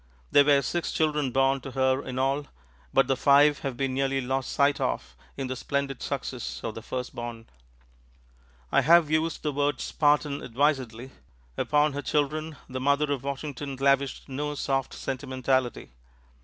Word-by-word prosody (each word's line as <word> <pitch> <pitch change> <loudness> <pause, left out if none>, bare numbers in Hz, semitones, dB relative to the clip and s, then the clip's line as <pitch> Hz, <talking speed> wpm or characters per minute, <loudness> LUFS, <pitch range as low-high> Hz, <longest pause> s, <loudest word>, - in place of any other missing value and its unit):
There 145 - +7
were 140 -1 +4
six 175 +7 -2
children 150 -3 +1
born 135 +1 +2
to 135 - -7
her 130 0 +2
in 130 - -6
all, 135 +2 0 0.4
but 135 - +4
the 135 - +1
five 145 +2 +5
have 135 -3 -4
been 135 0 -1
nearly 135 0 0
lost 130 +1 -2
sight 140 0 +2
of - - -2 0.2
in 135 - -2
the 130 0 -3
splendid 140 +1 -2
success 130 -3 -4
of 110 - -3
the 115 - -8
firstborn. 120 -1 -6 1.3
I 140 - +4
have 160 +2 +5
used 160 +1 0
the 150 - 0
word 145 +1 0
"Spartan" 145 -1 +1
advisedly. 130 -1 -1 0.4
Upon 150 0 +2
her 145 - -3
children, 150 +2 -1
the 130 0 -5
mother 145 +2 +2
of 140 -3 -1
Washington 140 0 -4
lavished 140 0 +1
no 145 +2 -3
soft 135 -2 -1
sentimentality. 130 - -2
135 Hz, 155 wpm, -27 LUFS, 130-145 Hz, 1.3 s, There